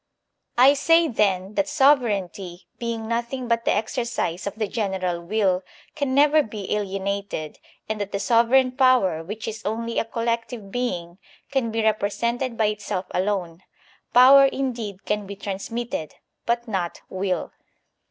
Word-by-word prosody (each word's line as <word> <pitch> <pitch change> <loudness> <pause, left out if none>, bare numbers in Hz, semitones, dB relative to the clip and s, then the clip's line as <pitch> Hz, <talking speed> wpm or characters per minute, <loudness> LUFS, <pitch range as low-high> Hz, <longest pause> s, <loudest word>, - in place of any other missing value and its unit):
I 260 +3 +7
say, 330 +4 +4
then, 200 -6 0
that 295 +6 0
sovereignty, 205 - +1
being 230 -2 -3
nothing 240 +2 -2
but 230 0 0
the - - +3
exercise 220 -5 -2
of 200 - -4
the 220 -1 -2
general 190 -5 -2
will, 190 0 +1 0.3
can 270 -2 -1
never 295 +2 +5
be 210 -6 -4
alienated, 195 -5 -3 0.3
and 215 -1 -3
that 205 0 -4
the - - -1
sovereign 245 +4 +4
power, 250 - +3
which 210 +5 -6
is 220 -1 -5
only 230 +2 -2
a - - +1
collective 230 -2 -3
being, 180 -8 -3 0.3
can 265 -4 0
be 225 0 -1
represented 230 +3 0
by 220 - +2
itself 205 -3 -2
alone; 185 -3 -2 0.5
power 270 +3 +8
indeed 235 -8 -4
can 210 -1 -1
be 200 - -6
transmitted, 205 - -5 0.3
but 235 +1 0
not 185 -5 -3
will. 185 -2 -2
220 Hz, 145 wpm, -24 LUFS, 195-245 Hz, 0.5 s, power